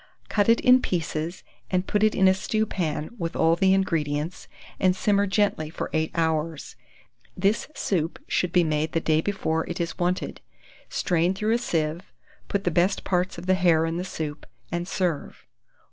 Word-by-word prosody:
Cut 205 0 +2
it 230 - +5
in 255 +1 +6
pieces, 165 -2 -3 0.3
and 185 0 0
put 210 - 0
it 215 0 +3
in 190 - +5
a 190 - +6
stewpan 190 -6 -2
with 165 -1 -3
all 165 +1 +4
the 190 +2 +3
ingredients, 165 -4 0 0.3
and 185 -1 +3
simmer 200 +1 +2
gently 190 -6 +1
for 160 - -5
8 160 0 +1
hours. 160 -2 -1 0.6
This 200 +4 +1
soup 165 -4 -1
should 180 - 0
be 180 -1 +4
made 155 0 -1
the 165 - +2
day 155 -1 +2
before 160 -4 -1
it 175 - -4
is 170 0 -3
wanted. 180 +1 -1 0.5
Strain 175 +1 +1
through 215 +3 0
a 235 - +2
sieve, 165 -4 -2 0.4
put 200 -1 -1
the 175 - +1
best 180 +4 +2
parts 180 -1 0
of 170 - -7
the 185 - +3
hare 170 -3 +3
in 165 +1 -2
the 180 - -2
soup, 155 -5 -5 0.2
and 175 0 -2
serve. 180 -7 -2
175 Hz, 175 wpm, -25 LUFS, 160-190 Hz, 0.6 s, in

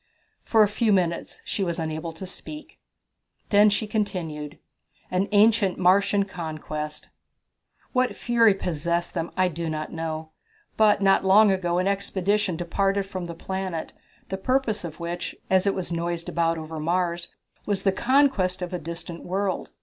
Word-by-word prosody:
For 220 -2 +5
a - - +4
few 215 +2 +1
minutes 175 -4 0
she 200 - -2
was 170 -2 -1
unable 160 +1 -3
to 165 +4 -8
speak. 300 +11 -9 0.7
Then 205 +1 +6
she 210 +2 0
continued: 170 -9 -3 0.5
An 185 +2 +1
Ancient 210 -2 +4
Martian 195 +2 +3
Conquest. 155 -4 -6 0.8
"What 255 -1 +1
fury 230 -4 +4
possessed 170 -1 -2
them 165 -1 -2
I 185 0 +4
do 170 -1 -3
not 155 0 -4
know, 160 -1 -4 0.4
but 210 -2 +4
not 195 0 +4
long 200 +2 +6
ago 175 -2 0
an 185 +1 +1
expedition 200 -1 0
departed 195 +3 0
from 185 -2 -5
the 170 - -6
planet, 190 -2 -4 0.4
the 190 - -2
purpose 225 -1 0
of 160 -3 -7
which, 170 +1 -4 0.2
as 190 +1 +4
it 200 - +2
was 185 -2 -4
noised 170 0 -2
about 165 -1 +1
over 160 0 -6
Mars, 170 +1 0 0.4
was 200 -2 0
the 195 - +4
conquest 235 -7 +2
of 180 - -5
a 180 - -2
distant 170 +1 -7
world. 190 +1 -2
185 Hz, 155 wpm, -25 LUFS, 170-200 Hz, 0.8 s, Then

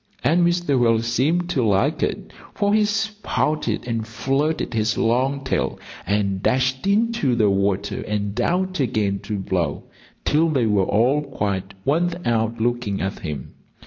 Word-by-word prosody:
And 170 +3 +3
Mr. 175 -6 +2
Whale 115 -2 +3
seemed 150 +9 +1
to 135 -7 +1
like 100 -3 +2
it, - - -2 0.2
for 205 0 +1
he 215 0 +4
spouted 205 - -1
and 115 -2 -2
flirted 135 +6 -1
his 110 0 0
long 130 +4 +1
tail 130 - -1 0.3
and 100 -2 0
dashed 130 - +1
into 220 - +2
the 105 -4 +3
water 100 +1 0
and 105 -1 -2
out 185 +1 0
again 105 -6 0
to 105 0 -4
blow, 90 -6 -2 0.4
till 160 +2 +3
they 135 -6 +1
were 105 -3 +2
all 125 +8 +3
quite 100 -8 -3
worn 170 +5 +2
out 115 0 0
looking 120 -4 -1
at 95 0 -3
him. 75 -5 -6
120 Hz, 150 wpm, -22 LUFS, 105-155 Hz, 0.4 s, he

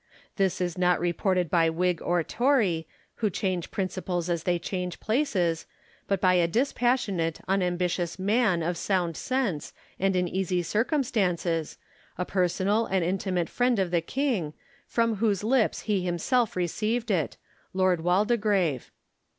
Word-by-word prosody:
This 190 -2 +1
is 180 -1 -2
not 180 -1 +3
reported 175 +1 +1
by 165 +1 +3
Whig 175 +1 0
or 175 -1 +1
Tory, 215 - +1 0.3
who 215 - +1
change 185 -2 -2
prin 195 -3 -1
ciples 180 -2 -3
as 170 -2 -1
they 175 -1 +2
change 180 +1 -4
places, 205 - 0 0.4
but 195 -1 +1
by 185 0 +4
a 175 -2 +3
dispassionate, 225 - 0
unam 185 -2 +1
bitious 175 -1 -1
man 200 -3 +2
of 170 +1 -1
sound 175 -3 0
sense 235 - -2 0.3
and 195 0 +1
in 180 -1 +1
easy 180 -1 -1
circumstances, 190 - 0 0.4
a 180 - -1
personal 190 +4 +1
and 185 -3 +1
intimate 185 -1 -1
friend 245 -1 +1
of 190 -3 0
the 170 -2 +2
king, 205 - -1 0.3
from 230 -2 +1
whose 205 -2 +1
lips 235 0 +2
he 205 -3 0
himself 185 +7 0
received 215 +6 -1
it 165 -7 0 0.2
— - - -36
Lord 185 -3 +2
Waldegrave. 195 - +1
185 Hz, 150 wpm, -27 LUFS, 175-215 Hz, 0.4 s, by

